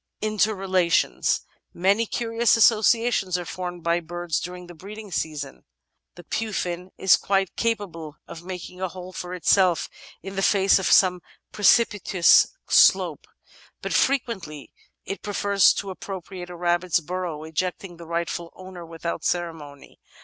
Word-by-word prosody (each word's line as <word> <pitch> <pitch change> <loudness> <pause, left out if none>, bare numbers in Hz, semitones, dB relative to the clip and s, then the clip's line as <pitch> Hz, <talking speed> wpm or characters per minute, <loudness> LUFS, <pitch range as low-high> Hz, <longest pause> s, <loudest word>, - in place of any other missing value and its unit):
Interrelations 195 -5 +1 0.3
Many 200 +6 +2
curious 230 0 +1
associations 225 -4 +3
are 175 - -5
formed 175 -1 -6
by 170 +1 +1
birds 175 -1 -3
during 180 0 -7
the 175 - -12
breeding 205 +4 -10
season. 150 -4 -4 0.5
The 175 - -12
Pufiin 180 -3 -3
is 190 - +5
quite 195 -2 -1
capable 180 -10 -3
of 165 - -10
making 180 0 -8
a 190 - 0
hole 185 +1 -10
for 180 0 -6
itself 180 -1 +2 0.3
in 195 +1 -7
the 195 - -1
face 195 0 +4
of 190 - -1
some 180 -2 +5 0.3
precipitous 205 -4 +4 0.2
slope, - - +4 0.6
but - - -3
frequently 195 - -1 0.3
it 195 - -5
pre 205 - -5
fers 200 -1 +4
to 195 -1 -5
appropriate 185 -1 -8
a 175 - -8
rabbit's 175 0 +1
burrow, 170 -2 -5
ejecting 175 +2 -4
the 170 -1 -11
rightful 170 0 -3
owner 185 -2 -10
without 165 0 -5
ceremony. 160 -5 -4
180 Hz, 135 wpm, -24 LUFS, 170-200 Hz, 0.6 s, is